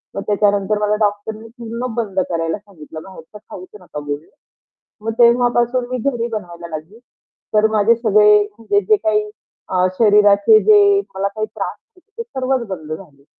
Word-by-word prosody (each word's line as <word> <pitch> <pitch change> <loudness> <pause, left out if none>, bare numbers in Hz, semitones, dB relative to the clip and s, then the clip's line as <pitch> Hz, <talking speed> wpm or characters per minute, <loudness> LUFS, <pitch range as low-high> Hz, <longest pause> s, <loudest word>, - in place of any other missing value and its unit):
मग 200 - -3
त्याच्यानंतर 205 0 +1
मला 210 0 +1
डॉक्टरने 215 +1 -2
पूर्ण 235 +2 -5
बंद 205 -5 -2
करायला 165 0 -2
सांगितलं 165 -6 -12
बाहेरचं 190 +1 -13
खाऊच 185 0 -9
नका 175 -4 -8
बोलले. 145 +1 -6 0.7
मग 225 +1 -3
तेव्हापासून 240 +1 +3
मी 255 - -2
घरी 235 -3 -3
बनवायला 175 -5 -7
लागली 165 +9 -13 0.6
तर 215 0 +5
माझे 220 +1 +3
सगळे 210 -2 +4 0.2
म्हणजे 405 - +1
जे 430 - +6
काही 420 +3 -1 0.4
अ, 185 0 +2
शरीराचे 205 - +5
जे 405 -2 +5
मला 195 +1 -1
काही 215 +2 -4
त्रास 215 - -6 0.2
होते 365 +4 -27
ते - - -2
सर्वच 265 - -2
बंद 160 -5 -7
झाले. 155 -5 -10
210 Hz, 155 wpm, -18 LUFS, 190-240 Hz, 0.7 s, जे